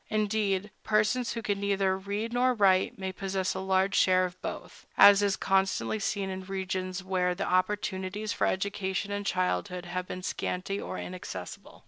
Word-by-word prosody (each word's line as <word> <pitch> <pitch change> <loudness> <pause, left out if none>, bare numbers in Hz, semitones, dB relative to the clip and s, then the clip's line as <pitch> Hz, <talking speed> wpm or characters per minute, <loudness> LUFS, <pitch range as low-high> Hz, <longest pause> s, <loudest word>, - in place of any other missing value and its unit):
Indeed, 210 -2 0
persons 215 +3 +1
who 230 -1 -5
can 205 -2 -1
neither 195 -1 +1
read 200 +4 -4
nor 250 +1 +3
write 190 -3 +3
may 190 -1 -3
possess 190 0 -2
a 190 - -4
large 190 +1 +1
share 185 0 +4
of 180 0 -8
both, - - -7
as 200 0 +9
is 200 -1 +1
constantly 195 +2 +1
seen 200 -1 -1
in 190 0 -5
regions 185 -1 -3
where 180 -1 0
the 185 - -2
opportunities 190 +2 -1
for - - +1
education 195 0 -2
in 205 0 -3
childhood 180 0 -1
have 180 +1 -4
been 185 - -6
scanty 190 +2 -3
or - - -5
inaccessible. 135 - -7
195 Hz, 165 wpm, -29 LUFS, 185-205 Hz, -, as